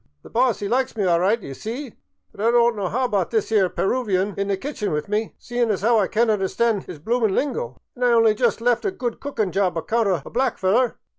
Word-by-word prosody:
The - - -14
boss 240 -3 +1
'e - - -1
likes 250 +1 0
me 205 - 0
all 175 -2 +3
right, 200 +6 +2
d'ye 140 -10 -8
see, 235 - -6 0.4
but 200 - -10
I 230 - +4
don't 235 0 +4
know 200 -3 -2
'ow 245 +8 -1
about 200 -7 0
this 220 -1 -1
'ere 200 -4 +3
Peruvan 200 -3 0
in 200 0 -2
the 200 -1 0
ki'chen 240 -2 -4
with 150 0 -2
me, 210 +2 -2
seein' 240 -1 -1
as 200 -2 -1
'ow 230 0 +4
I 195 - +2
can't 225 +1 +2
understand 210 +1 0
'is 180 - -7
bloomin' 220 +5 0
lingo. 380 - -2 0.2
An' 250 - -14
I 250 - +4
only 225 -2 +5
jus' 230 0 +1
left 240 0 +2
a 400 - +1
good 250 -11 -4
cookin' 220 -9 -2
job 185 -1 0
account 225 +6 0
o' 180 -6 +1
a - - -8
black 260 +3 0
feller. 225 +7 +2
220 Hz, 245 wpm, -22 LUFS, 195-240 Hz, 0.4 s, only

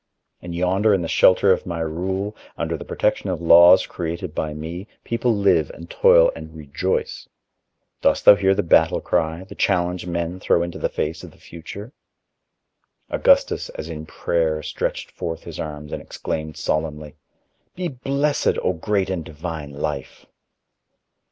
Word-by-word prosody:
And 85 -1 -7
yonder 95 +4 +2
in 90 - -1
the - - -3
shelter 95 +3 +4
of 95 - 0
my 85 -2 -3
rule, 95 +6 -3 0.2
under - - -2
the - - -7
protection - - -1
of 90 -3 -2
laws 85 +2 +7
created 85 0 -5
by 75 0 -2
me, 80 +6 -7 0.2
people 120 +1 0
live 95 -7 +2
and 85 0 -11
toil 85 - +5
and 80 0 -10
rejoice. 80 +5 -3 0.7
Dost - - +2
thou - - +11
hear 95 -1 +2
the - - 0
battle 80 -1 +4
cry, 80 0 -1
the 95 - -12
challenge 90 -2 0
men 85 +1 -3
throw 85 - +2
into 85 0 -6
the - - -1
face 80 +2 -3
of - - -9
the - - -21
future?" 100 - -10 1.2
Augustus, - - +2
as 80 - -6
in 80 -1 -7
prayer, 80 -2 -1
stretched - - -3
forth 80 -1 -5
his - - -9
arms 75 -1 -6
and - - -4
exclaimed 80 -1 -5
solemnly: 75 -1 -3 0.6
"Be 180 0 -2
blessed, 140 +1 0
O 95 - +1
great 95 +3 -1
and 90 -4 -3
divine 80 -2 -6
Life!" 70 -1 -5
85 Hz, 160 wpm, -22 LUFS, 80-95 Hz, 1.2 s, thou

